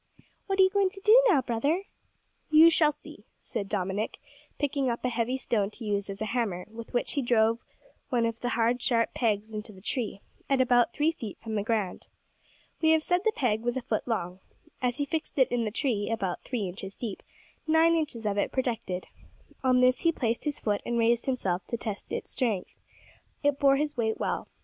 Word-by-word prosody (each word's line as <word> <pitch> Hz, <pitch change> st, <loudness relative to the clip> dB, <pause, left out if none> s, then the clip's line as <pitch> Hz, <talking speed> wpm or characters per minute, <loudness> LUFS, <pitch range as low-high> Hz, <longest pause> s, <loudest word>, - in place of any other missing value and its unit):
"What 390 Hz, 0 st, -1 dB
are -, -, +9 dB
you 375 Hz, -, +4 dB
going 395 Hz, -1 st, +3 dB
to 390 Hz, +1 st, -12 dB
do 440 Hz, +5 st, +7 dB
now, 300 Hz, -, +4 dB
brother?" 280 Hz, +11 st, 0 dB, 0.7 s
"You 315 Hz, +2 st, +8 dB
shall 310 Hz, -2 st, +4 dB
see," 300 Hz, -5 st, -14 dB, 0.2 s
said 200 Hz, -1 st, -5 dB
Dominick, 200 Hz, +1 st, -2 dB, 0.4 s
picking 280 Hz, -2 st, 0 dB
up 235 Hz, +1 st, -3 dB
a -, -, +2 dB
heavy 240 Hz, +2 st, -1 dB
stone 210 Hz, -6 st, 0 dB
to 225 Hz, +2 st, -10 dB
use 200 Hz, -1 st, -1 dB
as 195 Hz, 0 st, -6 dB
a 220 Hz, -, -4 dB
hammer, 205 Hz, -8 st, -1 dB
with 225 Hz, 0 st, -9 dB
which 245 Hz, -, 0 dB
he 285 Hz, -, 0 dB
drove 230 Hz, -2 st, +3 dB, 0.5 s
one 240 Hz, -3 st, +2 dB
of 230 Hz, 0 st, -2 dB
the 245 Hz, -, -2 dB
hard, 240 Hz, +1 st, +1 dB
sharp 230 Hz, -2 st, +1 dB
pegs 220 Hz, -2 st, 0 dB
into 215 Hz, 0 st, -5 dB
the 190 Hz, -, -14 dB
tree, 210 Hz, -1 st, -3 dB, 0.3 s
at 275 Hz, -1 st, +3 dB
about 245 Hz, -2 st, +4 dB
three 300 Hz, +5 st, +1 dB
feet 230 Hz, -11 st, -7 dB
from 225 Hz, -1 st, -6 dB
the 210 Hz, -, +1 dB
ground. 210 Hz, -3 st, -2 dB, 0.7 s
We 320 Hz, -, +4 dB
have 320 Hz, -1 st, +2 dB
said 355 Hz, +1 st, +2 dB
the 440 Hz, -, +3 dB
peg 220 Hz, -5 st, 0 dB
was 240 Hz, +2 st, -1 dB
a 260 Hz, -, -4 dB
foot 220 Hz, +1 st, -2 dB
long. 185 Hz, -6 st, -2 dB, 0.4 s
As 250 Hz, 0 st, 0 dB
he 285 Hz, -, 0 dB
fixed 315 Hz, +1 st, -4 dB
it 260 Hz, -, +4 dB
in 240 Hz, -2 st, +1 dB
the -, -, 0 dB
tree 220 Hz, -3 st, -1 dB
about 195 Hz, -6 st, -2 dB
three 245 Hz, -5 st, -3 dB
inches 190 Hz, +2 st, -7 dB
deep, 220 Hz, -6 st, -5 dB, 0.5 s
nine 320 Hz, +1 st, +5 dB
inches 290 Hz, -9 st, -2 dB
of 205 Hz, -1 st, 0 dB
it -, -, 0 dB
projected. 225 Hz, -8 st, -2 dB, 0.6 s
On 255 Hz, -1 st, +4 dB
this 255 Hz, 0 st, +4 dB
he 335 Hz, -, +3 dB
placed 235 Hz, -5 st, -2 dB
his 295 Hz, -1 st, -2 dB
foot 205 Hz, -2 st, 0 dB
and 240 Hz, -, -2 dB
raised 235 Hz, +2 st, +2 dB
himself 190 Hz, -9 st, -1 dB
to 235 Hz, -, -2 dB
test 215 Hz, -2 st, -5 dB
its -, -, -4 dB
strength. 220 Hz, -8 st, -1 dB, 0.7 s
It 285 Hz, -1 st, +2 dB
bore 275 Hz, -1 st, +5 dB
his 295 Hz, +1 st, -1 dB
weight 220 Hz, -2 st, 0 dB
well. -, -, -2 dB
235 Hz, 210 wpm, -28 LUFS, 215-280 Hz, 0.7 s, are